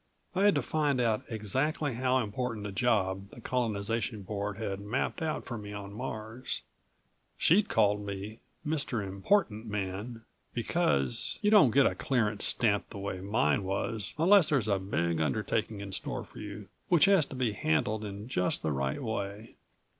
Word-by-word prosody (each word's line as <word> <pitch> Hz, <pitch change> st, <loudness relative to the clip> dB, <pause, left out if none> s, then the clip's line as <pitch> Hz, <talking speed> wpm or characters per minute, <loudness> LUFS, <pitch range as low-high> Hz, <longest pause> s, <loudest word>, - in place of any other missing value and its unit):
I 190 Hz, +2 st, +2 dB
had 205 Hz, -, +6 dB
to -, -, +1 dB
find 145 Hz, -4 st, +1 dB
out 115 Hz, -3 st, +2 dB
exactly 130 Hz, +7 st, -1 dB
how 130 Hz, +2 st, +2 dB
important 115 Hz, -1 st, -2 dB
a 100 Hz, -, -4 dB
job 100 Hz, -4 st, +1 dB
the -, -, -12 dB
Colonization 115 Hz, -2 st, -1 dB
Board 100 Hz, 0 st, -3 dB
had 100 Hz, -3 st, -3 dB
mapped 110 Hz, -, -2 dB
out 160 Hz, -1 st, -2 dB
for 120 Hz, -3 st, -5 dB
me 105 Hz, 0 st, -7 dB
on 100 Hz, -1 st, -7 dB
Mars. 110 Hz, +1 st, -5 dB, 0.7 s
She'd 200 Hz, +5 st, +4 dB
called 105 Hz, -1 st, +3 dB
me 100 Hz, +2 st, -6 dB, 0.3 s
"Mr. 140 Hz, -8 st, -1 dB
Important 110 Hz, -, +1 dB
Man" 105 Hz, +3 st, -4 dB, 0.3 s
because 125 Hz, -1 st, 0 dB
you 210 Hz, -, +4 dB
don't 205 Hz, -, +8 dB
get 135 Hz, +4 st, +5 dB
a -, -, +3 dB
clearance 110 Hz, -6 st, 0 dB
stamped 105 Hz, -4 st, +1 dB
the -, -, -8 dB
way 100 Hz, -1 st, -4 dB
mine 95 Hz, -5 st, +1 dB
was 100 Hz, +2 st, -2 dB
unless 180 Hz, +2 st, +6 dB
there's 135 Hz, -8 st, +2 dB
a 100 Hz, -2 st, +2 dB
big 85 Hz, -4 st, 0 dB
undertaking 80 Hz, -, -1 dB
in 100 Hz, -1 st, -6 dB
store -, -, -3 dB
for -, -, -13 dB
you 105 Hz, -1 st, -7 dB, 0.2 s
which 175 Hz, -2 st, +6 dB
has 195 Hz, -7 st, +5 dB
to -, -, -8 dB
be 125 Hz, -4 st, 0 dB
handled 105 Hz, +5 st, 0 dB
in 100 Hz, +1 st, -6 dB
just 90 Hz, -8 st, 0 dB
the 80 Hz, -, 0 dB
right 70 Hz, -, -1 dB
way. 105 Hz, -1 st, -4 dB
110 Hz, 170 wpm, -30 LUFS, 100-130 Hz, 0.7 s, don't